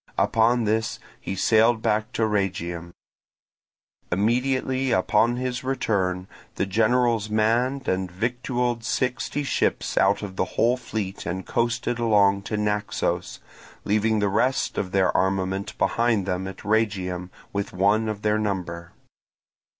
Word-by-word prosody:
Upon 115 +2 +3
this 110 +1 0 0.2
he 95 - -4
sailed 110 +3 +3
back 110 -1 0
to 115 - 0
Rhegium. 90 -5 -1 1.2
Immediately 130 +6 +1
upon 110 +5 +3
his 125 0 -3
return 95 -8 -1 0.3
the - - 0
generals 115 +1 +2
manned 120 +5 +1
and 95 0 0
victualled 120 +3 -1
sixty 125 +4 -1
ships 140 - 0
out 100 +1 +3
of 95 -2 -7
the - - +1
whole 120 +2 +4
fleet 110 -6 -5
and 95 +2 -3
coasted 120 0 -1
along 100 -4 +3
to 105 - -1
Naxos, 105 0 -1 0.4
leaving 110 +1 +1
the 105 -1 +1
rest 125 +7 +1
of 90 - -3
the 95 -2 +3
armament 95 +1 -1
behind 115 -4 +1
them 95 0 -2
at 95 0 -9
Rhegium 95 -5 0 0.2
with 100 0 -2
one 100 +4 +2
of 105 -1 -5
their 105 0 +2
number. 90 -5 -3
105 Hz, 130 wpm, -24 LUFS, 95-120 Hz, 1.2 s, whole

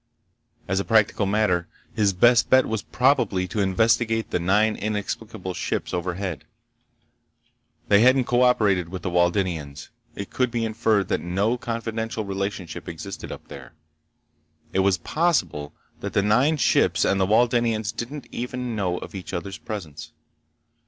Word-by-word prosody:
As 95 +1 0
a - - 0
practical 110 -2 +2
matter, 100 -4 +1 0.3
his 105 -2 +2
best 120 +5 +4
bet 130 0 +5
was 110 -2 -2
probably 95 -2 +1
to 105 - -4
investigate 115 +3 +1
the 90 - +1
nine 105 +5 +2
inexplicable 105 -2 -4
ships - - -3
overhead. 90 -2 -3 1.4
They 100 - +5
hadn't 130 +2 +5
co 120 +1 +1
operated 100 -8 +3
with 95 0 -7
the 90 - -2
Waldenians. 85 -5 0 0.3
It 100 - -7
could 125 -1 +1
be 115 -1 -1
inferred 110 -3 +1
that - - 0
no 100 +7 0
confidential 115 -2 -4
relationship 100 -2 -4
existed 90 +4 -7
up - - -9
there. 65 -3 -11 1.0
It - - +1
was 95 -1 +3
possible 95 - 0 0.3
that - - -5
the 100 - +2
nine 125 +10 +3
ships - - +3
and 100 -1 +2
the 95 - +2
Waldenians 115 -1 +2
didn't 135 +4 -6
even 125 -1 -4
know 90 -4 -1
of - - -8
each 95 0 -7
other's 95 +3 -5
presence. 85 -9 -7
105 Hz, 145 wpm, -24 LUFS, 90-115 Hz, 1.4 s, bet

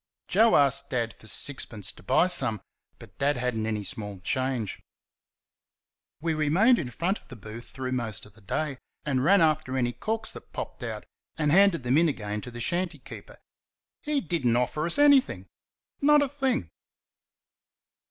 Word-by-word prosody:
Joe 225 +1 +4
asked 140 0 +3
Dad 115 -4 -1
for 110 - -15
sixpence 110 -5 -3
to - - -17
buy 100 - +3
some, 130 - +1 0.4
but - - -15
Dad 140 0 +2
had 125 -1 -1
n't 110 0 -2
any 105 -2 -2
small 105 -3 -5
change. 130 0 -2 1.4
We 165 +1 -1
remained 175 +11 +4
in 130 - -3
front 175 - -1
of - - -26
the 125 - -10
booth 110 +2 -10
through 130 -1 -5
most 115 -4 -3
of 105 - -17
the 110 - -19
day, 135 +7 -3 0.3
and 130 -3 0
ran 195 +5 +5
after 155 -4 +1
any 120 -2 +1
corks 220 - -3
that - - -13
popped - - -6
out - - -5 0.3
and 150 -2 +1
handed 190 -4 +5
them 125 +5 +3
in 170 -1 +4
again 105 -6 -4
to 125 - -8
the 120 0 -9
shanty 170 +6 -1
keeper. 130 - -12 0.6
He 295 -2 0
did 170 -3 -2
n't 120 -1 +3
offer 150 +6 0
us 170 - +2
anything 285 -2 +4 0.6
not 295 0 +6
a - - 0
thing! 265 -3 -1
140 Hz, 175 wpm, -27 LUFS, 120-175 Hz, 1.4 s, not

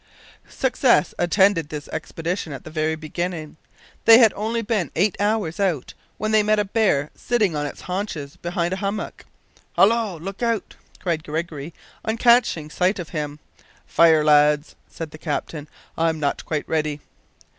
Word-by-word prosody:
Success 260 -6 +2
attended 175 -2 +3
this 150 -1 -6
expedition 165 +1 -4
at 135 - -8
the 155 - -10
very 155 0 0
beginning. 160 0 -5 0.5
They 225 0 +10
had 230 -3 +6
only 225 +3 -2
been 210 -5 -1
eight 195 +3 +2
hours 205 -4 0
out 175 -10 -1 0.2
when 215 0 -2
they 215 -1 +5
met 215 +1 +2
a 210 - +1
bear 195 -9 +1
sitting 215 -9 0
on 145 0 -1
its - - -9
haunches 180 -7 -4
behind 175 0 -2
a - - -2
hummock. 200 +2 -4 0.5
"Hallo! 220 -4 +3
look 195 +6 -7
out!" 230 -4 -1 0.3
cried 165 -3 -2
Gregory, 155 -1 -4 0.3
on 220 +1 -1
catching 235 -11 +3
sight 185 +5 +1
of 175 -4 -6
him. 150 -2 -4 0.5
"Fire, 160 -2 +5
lads," 150 0 +4 0.2
said 160 -2 -7
the 155 - -11
captain, 150 -1 -4 0.3
"I'm 160 -1 0
not 145 -2 -1
quite 155 -2 -3
ready." 155 -2 -1
170 Hz, 155 wpm, -22 LUFS, 155-210 Hz, 0.5 s, They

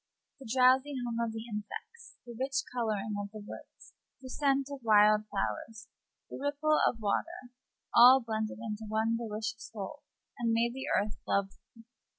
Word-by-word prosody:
The 260 -4 -11
drowsy 260 +3 +4
hum 235 -1 -3
of 230 - -2
the 220 0 -6
insects, 445 - -8
the 240 -1 -9
rich 270 +3 -1
coloring 215 -3 -1
of 200 - -6
the 215 - -10
woods, - - -12 0.3
the 260 - -10
scent 275 -1 +1
of 280 - -6
wild 215 -1 +5
flowers, 220 - -4 0.4
the - - -8
ripple 290 +2 +1
of 230 - -1
water, 245 +5 -3 0.4
all 250 +3 +9
blended 220 -3 -3
into 220 -1 -5
one 220 +2 +1
delicious 220 -1 -4
whole, 220 +7 -7 0.4
and 230 -1 +1
made 235 +1 +1
the 265 +2 -6
earth 205 +1 -4
lovely. 200 +3 -3
230 Hz, 160 wpm, -31 LUFS, 215-265 Hz, 0.4 s, all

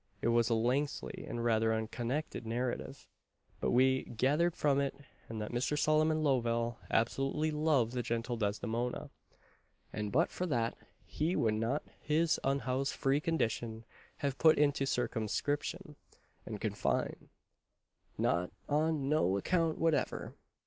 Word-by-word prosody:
It 115 - 0
was 115 0 +3
a 115 - +3
lengthy, 130 +6 -1
and 120 0 -3
rather 110 -1 +3
unconnected 120 +6 -2
narrative, 125 +4 -3 0.5
but - - 0
we 130 +1 +3
gathered 145 +9 +1
from 140 -1 +2
it 140 -1 -1 0.3
that 110 -2 -4
Mr. 125 +5 0
Solomon 155 +1 +3
Lovell 120 -4 +1
absolutely 135 +6 +1
loved 150 -6 +2
the 125 - 0
gentle 115 +1 -2
Desdemona; 115 +3 -2 0.8
and 105 -1 -3
but 165 +6 +2
for 180 - -2
that, 115 -6 0 0.3
"he 165 +4 -1
would 110 -2 +2
not 115 +7 0 0.2
his 160 +2 +2
unhoused 135 0 0
free 135 +1 +2
condition 115 -8 -1 0.3
have 140 -2 -2
put 160 -1 +6
into 145 -2 +2
circumscription 145 - -2 0.5
and - - -5
confine," - - -1 0.9
"not 85 +2 +1 0.2
on 150 -1 +1
no 145 -10 +2
account 165 - +1
whatever." 165 -2 0
130 Hz, 130 wpm, -33 LUFS, 115-150 Hz, 0.9 s, put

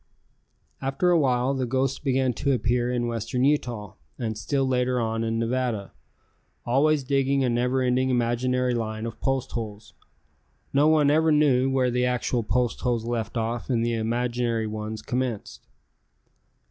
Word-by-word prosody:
After 135 +7 +1
awhile 135 -5 +2
the 130 -2 -2
ghost 130 +2 -1
began 130 -2 +1
to 140 +4 0
appear 120 +1 0
in 120 -1 0
western 115 +2 -2
Utah 120 -8 0 0.2
and 110 -2 -3
still 135 +6 -1
later 125 -1 +1
on 115 0 -1
in 115 0 -1
Nevada, 115 -3 -1 0.7
always 145 +4 +2
digging 135 0 +1
a 125 - +1
never 125 +2 +1
ending 130 +1 +1
imaginary 125 +1 +1
line 110 -1 -3
of 115 -1 -6
post 135 -1 -1
holes. 110 -2 -6 0.8
No 145 +2 +4
one 155 -2 +4
never 155 +2 +4
knew 135 -4 +3
where 130 -2 +1
the 125 +1 +1
actual 125 0 0
post 120 +2 0
holes 120 -3 0
left 115 -1 -3
off 115 +3 -2
and 115 -3 +1
the 120 - 0
imaginary 120 0 -1
ones 110 0 -5
commenced. 120 - -4
125 Hz, 150 wpm, -25 LUFS, 115-130 Hz, 0.8 s, No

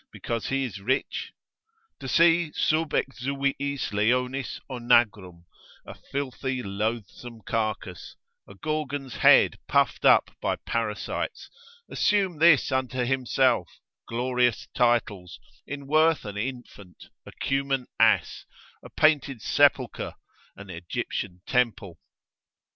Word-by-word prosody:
because 115 -2 -4
he 135 0 0
is 105 -6 -7
rich? 130 +7 -2 0.7
To 135 - -7
see 165 +2 +4
sub 155 0 +1
exuviis 140 0 -2
leonis 125 +5 0
onagrum, 105 -8 +1 0.4
a - - -9
filthy 130 -2 -4
loathsome 110 +3 -4
carcass, 110 0 -4 0.3
a - - -13
Gorgon's 145 -3 -4
head - - +5
puffed - - +1
up - - +5
by - - 0
parasites, - - -4 0.4
assume 195 -6 0
this 165 -4 +5
unto 130 -1 -1
himself, 130 -5 +1 0.4
glorious 125 0 0
titles, 105 -7 0 0.3
in 140 0 -6
worth 155 0 +3
an 105 -1 -6
infant, 105 -6 -7 0.2
a - - -9
Cuman 135 -1 -1
ass, - - +2 0.3
a - - -12
painted 145 -5 +2
sepulchre, 130 -1 +1 0.4
an 100 -1 -11
Egyptian 90 +1 -5
temple? 115 -8 -1
125 Hz, 105 wpm, -26 LUFS, 110-140 Hz, 0.7 s, head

